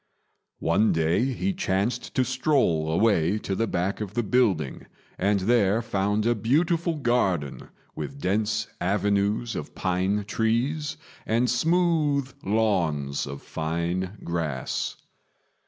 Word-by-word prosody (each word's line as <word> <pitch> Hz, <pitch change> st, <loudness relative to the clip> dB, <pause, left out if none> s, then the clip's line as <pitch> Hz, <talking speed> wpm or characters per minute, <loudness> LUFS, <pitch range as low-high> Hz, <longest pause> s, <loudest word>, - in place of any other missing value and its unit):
One 85 Hz, +7 st, +2 dB
day 80 Hz, +8 st, +2 dB
he 135 Hz, +9 st, -1 dB
chanced 120 Hz, -, -1 dB
to 130 Hz, -, +3 dB
stroll 115 Hz, -, +1 dB
away 95 Hz, 0 st, +3 dB
to 100 Hz, -, -4 dB
the 115 Hz, +4 st, 0 dB
back 95 Hz, +4 st, -1 dB
of 105 Hz, -1 st, -5 dB
the 120 Hz, -, +1 dB
building, 100 Hz, -, +1 dB, 0.3 s
and 100 Hz, +1 st, +2 dB
there 110 Hz, +1 st, +3 dB
found 105 Hz, 0 st, 0 dB
a 120 Hz, -, +4 dB
beautiful 160 Hz, -, +1 dB
garden 110 Hz, -, 0 dB, 0.3 s
with 140 Hz, -, -6 dB
dense 105 Hz, 0 st, 0 dB, 0.2 s
avenues 100 Hz, +4 st, +1 dB
of 75 Hz, -, -6 dB
pine 95 Hz, +3 st, 0 dB
trees 120 Hz, +9 st, 0 dB, 0.3 s
and 115 Hz, +3 st, +2 dB
smooth 150 Hz, 0 st, +1 dB
lawns 85 Hz, -11 st, 0 dB
of 70 Hz, 0 st, -7 dB
fine 85 Hz, +5 st, -2 dB
grass. 80 Hz, -6 st, -2 dB
105 Hz, 120 wpm, -26 LUFS, 90-125 Hz, 0.3 s, a